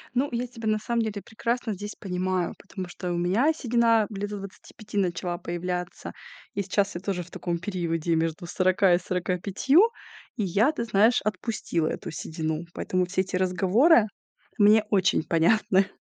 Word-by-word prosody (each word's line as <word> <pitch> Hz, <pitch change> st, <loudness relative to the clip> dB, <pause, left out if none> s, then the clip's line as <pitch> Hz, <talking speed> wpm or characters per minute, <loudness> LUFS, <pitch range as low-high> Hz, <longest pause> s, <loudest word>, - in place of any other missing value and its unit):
Ну, 275 Hz, +3 st, +1 dB
я 245 Hz, +1 st, -2 dB
тебя 230 Hz, -2 st, -7 dB
на 215 Hz, 0 st, +2 dB
самом 235 Hz, +1 st, -1 dB
деле 210 Hz, -2 st, -4 dB
прекрасно 235 Hz, 0 st, -2 dB
здесь 205 Hz, +2 st, -7 dB
понимаю, 185 Hz, -1 st, -2 dB
потому 190 Hz, -2 st, -7 dB
что 175 Hz, 0 st, -5 dB
у -, -, -1 dB
меня 200 Hz, -, +2 dB
седина 230 Hz, -5 st, +2 dB
лет 205 Hz, 0 st, -4 dB
до 205 Hz, -, -5 dB
25 205 Hz, +2 st, -9 dB
начала 175 Hz, -2 st, -1 dB
появляться. 180 Hz, +1 st, -4 dB, 0.4 s
И 200 Hz, -, 0 dB
сейчас 200 Hz, 0 st, 0 dB
я 175 Hz, -, -4 dB
тоже 190 Hz, -2 st, -2 dB
в 175 Hz, -, -16 dB
таком 170 Hz, -1 st, -3 dB
периоде 170 Hz, -3 st, -1 dB
между 165 Hz, +1 st, -1 dB
40 185 Hz, 0 st, +3 dB
и -, -, 0 dB
45, 190 Hz, -, +2 dB, 0.5 s
и 215 Hz, -, -1 dB
я, 205 Hz, -, +3 dB
ты 235 Hz, -, -3 dB
знаешь, 220 Hz, +3 st, +4 dB
отпустила 195 Hz, -5 st, -2 dB
эту 175 Hz, -, -4 dB
седину. 160 Hz, +1 st, -4 dB
Поэтому 185 Hz, 0 st, -1 dB
все 185 Hz, +1 st, 0 dB
эти 185 Hz, -1 st, -4 dB
разговоры 195 Hz, -, +4 dB, 0.5 s
мне 210 Hz, +1 st, +6 dB
очень 185 Hz, -5 st, +2 dB
понятны. 190 Hz, +3 st, +3 dB
195 Hz, 165 wpm, -26 LUFS, 180-220 Hz, 0.5 s, мне